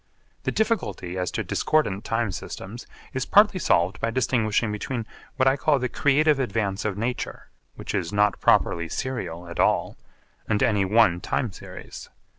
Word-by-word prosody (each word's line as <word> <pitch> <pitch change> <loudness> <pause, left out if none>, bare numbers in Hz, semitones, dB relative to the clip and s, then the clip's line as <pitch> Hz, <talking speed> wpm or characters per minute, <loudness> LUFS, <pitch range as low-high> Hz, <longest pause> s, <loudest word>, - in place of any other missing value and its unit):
The - - +1
difficulty 215 - -1
as 90 -1 -1
to - - -3
discordant 105 -11 0
time 115 -2 -1
systems 105 +6 -7 0.3
is 130 -2 -2
partly 205 -2 +5
solved 90 - +2
by 115 - 0
distinguishing 115 -3 +1
between 115 +3 -3 0.3
what 130 -2 +2
I 135 - +5
call 145 +1 +2
the 125 -1 -2
creative 145 +3 +3
advance 110 -6 -1
of 100 -3 -1
nature, 120 +3 -4 0.3
which - - -6
is 85 - -1
not 105 -1 +2
properly 85 -1 +3
serial 90 -10 -4
at 85 - -8
all, - - +2 0.5
and 105 -2 +2
any 100 -3 +2
one 100 -3 +4
time 125 -7 -1
series. - - -10
115 Hz, 160 wpm, -25 LUFS, 95-130 Hz, 0.5 s, partly